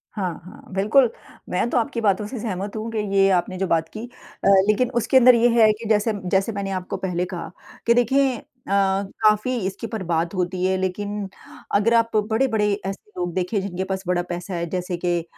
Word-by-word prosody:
हाँ, 185 -5 -2
हाँ। 185 - -12
बिल्कुल, 220 +6 +4 0.4
मैं 185 +6 0
तो - - 0
आपकी 230 0 -1
बातों 205 -1 +1
से 245 +2 -6
सहमत 200 -2 -4
हूँ 220 +1 -4
कि 225 - -4 0.2
ये 195 0 +5
आपने 185 +1 -3
जो 190 0 -1
बात 165 -1 +1
की। 215 - -6 0.4
अ, - - +2 0.2
लेकिन 235 +4 +2
उसके 260 - +3
अंदर 250 -1 +7
ये 235 +1 +4
है 215 -1 +7
कि 225 +2 -10
जैसे 215 +1 +3 0.2
जैसे 195 +4 +1
मैंने 200 -2 -4
आपको 180 - -6
पहले 180 -1 -2
कहा 175 - -6 0.4
कि 235 - +6
देखिए 260 +2 +2 0.3
अ, - - -5
काफ़ी 200 +4 +1
इसके 195 +4 -5
ऊपर 220 -4 -5
बात 170 +2 0
होती 180 0 -2
है 190 0 +2
लेकिन 200 +2 -3 0.5
अगर 210 +3 +3
आप 230 -1 +2
बड़े-बड़े 220 -3 +1
ऐसे 195 +2 -6
लोग 175 -1 -2
देखें 185 +3 -1
जिनके 190 -1 -3
पास 190 0 -3
बड़ा 180 -1 +1
पैसा 175 +2 -5
है। 170 - -2
जैसे 180 -1 -3
के 175 0 0
अ, - - -12
200 Hz, 205 wpm, -22 LUFS, 185-225 Hz, 0.5 s, अंदर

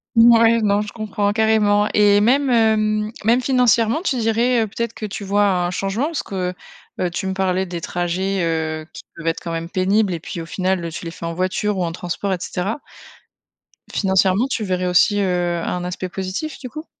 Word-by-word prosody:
Ouais, 230 0 +6
non, 205 -1 +2
je 210 - -6
comprends 205 -2 -1
carrément, 210 -2 +3
et 205 -1 +5
même, 265 +5 +3
hem, 215 -2 +2
même 235 +3 +4
financièrement, 245 0 +2
tu 350 - 0
dirais, 230 +1 +2
heu, - - 0
peut-être 235 +2 -4
que 215 - -6
tu 200 0 -6
vois 205 +1 +2
un 180 -3 +1
changement? 195 +8 -1
Parce 320 -1 -3
que, 185 -2 -3 0.5
heu, 180 - +1
tu 175 +3 -4
me 190 - -1
parlais 190 0 0
des 175 -2 -6
trajets, 180 +2 -2
heu, 160 -2 -2
qui - - -10
peuvent 165 0 -8
être 165 - -1
quand 170 - -4
même 165 0 -3
pénibles 195 +2 +1
et 165 - -5
puis, 170 - -6
au 165 - -5
final, 185 -1 -1
tu - - -6
les 165 - -5
fais 170 - -8
en 170 - -3
voiture 185 +3 -1
ou 180 - +1
en 170 - -2
transport, 175 +3 -4
et 185 - 0
cetera. 190 +8 -3 1.1
Financièrement, 190 +4 +2
tu 245 -4 -2
verrais 185 -2 -1
aussi, 205 +3 +3
heu, 175 -2 0
un 180 0 -2
aspect 180 +1 -4
positif 190 - -4
du 255 -3 -7
coup? 310 +4 -8
195 Hz, 205 wpm, -20 LUFS, 180-220 Hz, 1.1 s, Ouais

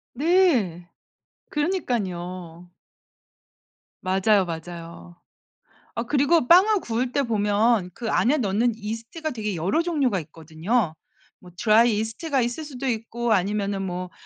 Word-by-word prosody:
네. 265 - +2 0.6
그러니깐요. 185 - -3 1.3
맞아요, 190 +1 +2
맞아요. 170 +1 -8 0.8
아 230 - -1
그리고 285 +2 +2
빵을 385 +3 +6
구울 240 +2 -2
때 280 - +1
보면 210 -3 +1
그 230 -3 -4
안에 290 +6 +2
넣는 225 +2 +1
이스트가 230 +9 -5
되게 215 -4 -3
여러 195 - +1
종류가 280 - 0
있거든요. 160 +5 -2 0.4
뭐 180 - -15
드라이 220 +1 +4
이스트가 255 +6 -1
있을 240 +6 -2
수도 270 -2 -6
있고 230 0 -2
아니면은 200 0 0
뭐 180 -1 -4
220 Hz, 260 characters per minute, -24 LUFS, 185-255 Hz, 1.3 s, 빵을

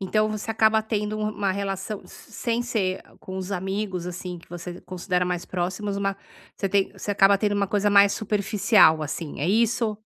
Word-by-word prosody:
Então 215 +3 +1
você 215 +1 -4
acaba 220 0 +4
tendo 215 -1 -2
u - - -4
uma 200 -2 -1
relação 195 +1 -4
s 180 - -15
sem 235 -1 -1
ser 195 -6 -1 0.2
com 185 - -7
os 190 0 -5
amigos, 190 -1 -3
assim, 180 0 -6
que 165 - -19
você 175 +1 -7
considera 180 0 -1
mais 180 -1 -2
próximos, 190 +3 -3
uma 195 0 -1 0.4
você 195 - -1
tem 195 0 +1
você - - -5
acaba 200 0 +5
tendo 205 +1 0
uma 200 0 +1
coisa 205 +1 +1
mais 200 0 +6
superficial, 205 -5 +3
assim, 155 0 -5
é 155 - 0
isso? 225 0 +1
200 Hz, 190 wpm, -25 LUFS, 185-210 Hz, 0.4 s, mais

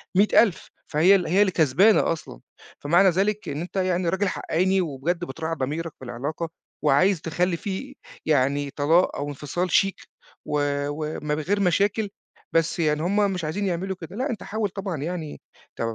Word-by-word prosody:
100000 205 0 +3 0.2
فهي 170 +6 +5
ال 180 -3 0
هي 185 +5 +3
اللي 200 -2 +4
كسبانة 170 +6 +4
أصلًا، 155 - -6 0.4
فمعنى 175 +6 +4
ذلك 200 +4 0
إن 145 +2 -3
أنت 175 - -8
يعني 185 -2 +1
راجل 190 +3 0
حقّاني، 185 +2 +1
وبجد 170 +3 -2
بتراعي 160 +3 -4
ضميرك 155 +5 -3
في 130 - -10
العلاقة، 145 +7 -4 0.4
وعايز 160 +5 +4
تخلّي 170 +2 0
فيه 205 +10 -5 0.3
يعني 140 -1 +1
طلاق 160 +6 +2
أو 145 +1 -3
انفصال 150 +5 -3
شيك، 195 +2 +2 0.4
و 150 - -1 0.3
ومن 150 0 -3
غير 195 +7 0
مشاكل، 200 +3 +1 0.5
بس 165 +1 +2
يعني 150 -2 +1
هم 200 +4 +2
مش 180 -3 -3
عايزين 160 +7 -2
يعملوا 190 +1 -2
كده، 165 +4 -8
لأ 260 +6 -2
أنت 230 - -4
حاول 215 -1 -2
طبعًا 195 -3 -4
يعني 165 -2 -5 0.3
ت - - -7
170 Hz, 165 wpm, -24 LUFS, 150-195 Hz, 0.5 s, فهي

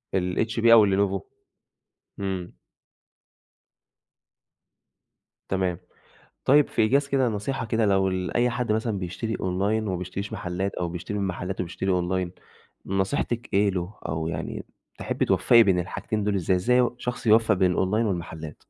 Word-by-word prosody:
الHP 110 +6 -1
أو 115 -2 +9
اللينوفو؟ 100 -1 +1 1.0
إمم. 95 -2 -4 3.0
تمام، 95 -2 -1 0.7
طيب 145 +2 +5
في 115 - +1
إيجاز 140 +6 +2
كده 135 -3 +2
نصيحة 115 +3 -3
كده 110 0 +1
لو 95 -1 +3
ال 95 -1 -3
أي 120 +1 +3
حد 120 -2 -1
مثلًا 110 -2 -1
بيشتري 95 +5 -4
أونلاين 100 +4 0
وما 95 - -1
بيشتريش 95 +3 -5
محلات، 95 +2 -3
أو 90 - -2
بيشتري 90 +4 -5
من 100 - -1
محلات 90 +1 -4
وبيشتري 90 +2 -3
أونلاين، 90 0 0 0.5
نصيحتِك 115 +5 -1
إيه 100 0 +4
له، 90 +2 -4
أو 80 +1 -2
يعني 80 -1 -5 0.3
تحبي - - -1
توفّقي 115 -1 +5
بين 95 -4 +3
الحاجتين 100 +4 -3
دول 105 -1 0
إزاي، 95 0 +1
إزاي 125 +8 +2
ي 120 -2 +2
شخص 125 -1 -5
يوفق 110 0 +5
بين 90 -1 +2
الأونلاين 105 +5 +1
والمحلات؟ 80 -5 -5
95 Hz, 145 wpm, -25 LUFS, 90-110 Hz, 3.0 s, أو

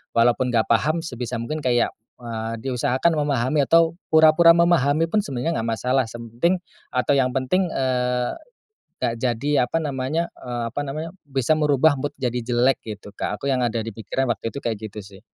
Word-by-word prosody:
walaupun 120 +2 +3
enggak 115 -3 +2
paham 155 +8 +2
sebisa 125 -4 -5
mungkin 135 +7 -4
kayak, 120 -2 +2 0.3
eee, 115 -2 -5
diusahakan 130 +5 +1
memahami 140 0 +1
atau 165 0 +5 0.2
pura-pura 160 +2 +6
memahami 165 -2 +3
pun 215 - +3
sebenarnya 150 -3 -2
enggak 115 - -2
masalah 125 +3 +1
semting 120 +10 -1 0.3
atau 125 +2 +1
yang 135 -2 +3
penting, 175 +8 +1
eee, 125 -3 0 0.7
enggak 115 - +1
jadi 125 +2 +1
apa - - 0
namanya, 145 +4 -2
eee, 120 -1 -4
apa 145 - -2
namanya, 155 +4 -5 0.2
bisa 135 +1 +1
merubah 150 -1 +3
mood 145 +1 -4
jadi 125 -2 -1
jelek 120 +2 +2
gitu 105 -2 -9
Kak. - - -3
Aku - - -8
yang 130 -1 +1
ada 115 -2 0
di 115 - -5
pikiran 115 +5 -2
waktu 115 +2 -5
itu - - -9
kayak 110 -3 -2
gitu 105 - -9
sih. 100 +1 -15
130 Hz, 175 wpm, -23 LUFS, 120-150 Hz, 0.7 s, pura-pura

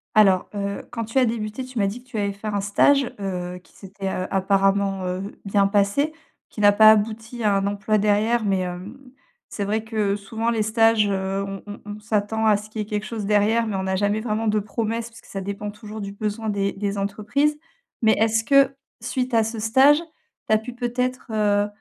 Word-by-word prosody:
Alors, 195 -4 +4
heu, 200 0 -3
quand 230 -2 -3
tu 225 +4 -4
as 255 - +4
débuté, 220 +1 -3
tu 255 -1 -9
m'as 200 - +2
dit 235 +5 -6
que - - -28
tu 225 - -5
avais 200 -1 0
fait 205 +2 -8
un 205 -1 -1
stage, 260 +6 +3
heu, 180 -2 -4
qui - - -25
s'était, 195 0 -8
heu, 185 0 -3
apparemment, 195 0 +1
heu, 180 +1 -3 0.2
bien 195 0 +3
passé. 205 +10 +1 0.4
Qui 210 - -6
n'a 205 - +7
pas 215 +1 +7
abouti 220 +2 +1
à 210 - +3
un 195 0 +1
emploi 205 +1 0
derrière, 215 +3 +2
mais, 195 -2 +1
hem, 180 +6 -6 0.5
c'est 200 - -3
vrai 215 +2 -1
que 215 -3 0
souvent 225 +3 -3
les 225 -2 +1
stages, 225 -1 +3
heu, 195 0 -1
on 195 0 -6
on 205 - -8
on 210 0 -7
s'attend 220 +1 0
à 210 -1 +5
ce 210 +1 -10
qu'il 215 - -6
y - - -1
ait - - -10
quelque 210 0 -3
chose 220 -2 -4
derrière, 215 +2 +3
mais 210 - -2
on 190 - -2
n'a 190 0 -1
jamais 205 +2 +1
vraiment 220 0 -2
de 215 0 +2
promesses, 225 +3 -3
parce 230 - -15
que - - -21
ça 195 - -5
dépend 200 +1 -5
toujours 210 +1 -8
du 200 0 -5
besoin 215 +2 -3
des 200 -1 0
des 200 0 -3
entreprises. 215 +9 0 0.5
Mais 220 -1 +5
est-ce 220 0 +2
que, 275 +1 +4 0.3
suite 250 +1 -2
à 225 - +5
ce 225 +1 -4
stage, 265 +7 +5 0.5
tu - - +3
as - - +5
pu 235 +3 -7
peut-être, 250 +1 -2
heu, 205 -1 +2
210 Hz, 225 wpm, -23 LUFS, 200-225 Hz, 0.5 s, n'a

